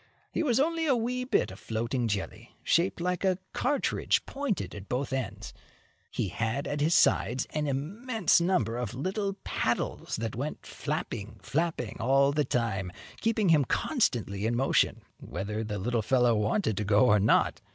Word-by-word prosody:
He - - -1
was 260 -6 +2
only 325 +2 +1
a 270 - +4
wee 250 +2 -1
bit 255 - +1
of - - -11
floating 115 +2 -2
jelly, 105 +2 -4
shaped 175 +3 +2
like 180 +1 -1
a 190 -2 +2 0.2
cartridge 285 +3 +1
pointed 275 -7 -3
at 100 -1 -9
both 135 +2 -2
ends. 110 -5 -4 0.6
He 100 - -2
had 115 - -2
at 145 0 -2
his 160 +3 +3
sides 125 +3 +3
an 150 -1 -1
immense 185 - +1
number 130 - +1
of 120 -1 -4
little 195 - -2
paddles - - -1
that 115 0 -3
went 140 +6 -4
flapping, 120 -8 -4
flapping 155 -6 -2
all 135 +4 +4
the 150 0 +1
time, 100 -7 -1 0.3
keeping 225 -4 +1
him 155 -3 +5
constantly 115 - 0
in 120 - 0
motion, 135 +3 +2 0.2
whether 105 +5 -4
the 105 -1 -4
little 115 +4 0
fellow 120 +2 +3
wanted 110 - 0
to 105 - 0
go 105 +4 +4
or 105 -4 +5
not. 100 - +3
135 Hz, 165 wpm, -29 LUFS, 110-185 Hz, 0.6 s, him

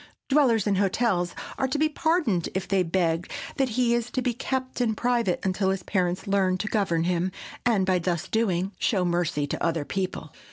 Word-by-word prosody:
Dwellers 260 -7 +4
in 200 -2 +2
hotels 195 -2 +1 0.2
are 265 - +2
to 265 - -1
be 310 +1 +3
pardoned 310 - +1
if 190 - -2
they 195 0 +2
beg 165 -1 0 0.3
that 270 -2 +2
he 240 -1 +3 0.2
be 245 - +1
kept 260 +1 -3
in 225 -3 +1
private 235 -5 +1
until 190 0 +1
his 190 -1 -1
parents 180 -1 -1
learn 195 -2 +2
to 215 - -3
govern 190 -7 +1
him, 180 +1 0 0.4
and 210 -6 +3
by 185 -1 +2
thus 170 -1 -2
doing, 195 -4 0
show 190 -5 +1
mercy 170 -4 0
to 145 - -4
other 165 -3 0
people. 185 -5 -4
190 Hz, 185 wpm, -26 LUFS, 175-235 Hz, 0.4 s, Dwellers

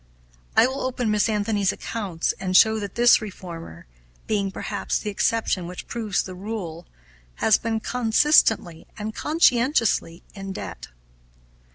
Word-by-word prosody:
I - - +7
will 260 +2 -3
open 250 -3 -1
Miss 210 +1 +2
Anthony's 205 -2 +1
accounts 195 -8 -3
and 185 -1 +2
show 220 0 +5
that 200 -2 -6
this 240 0 +5
reformer, 170 - -9 0.4
being, 200 -2 0
perhaps, - - -3
the 210 - -4
exception 200 -4 0
which 180 +1 -8
proves 215 -5 -2
the 185 - -8
rule, 180 -4 -6 0.5
has 220 - +3
been 225 -1 -2
consistently 225 - +2
and 215 0 -5
conscientiously 240 - +1
in 195 -1 -7
debt. 85 - -7
210 Hz, 135 wpm, -24 LUFS, 185-230 Hz, 0.5 s, I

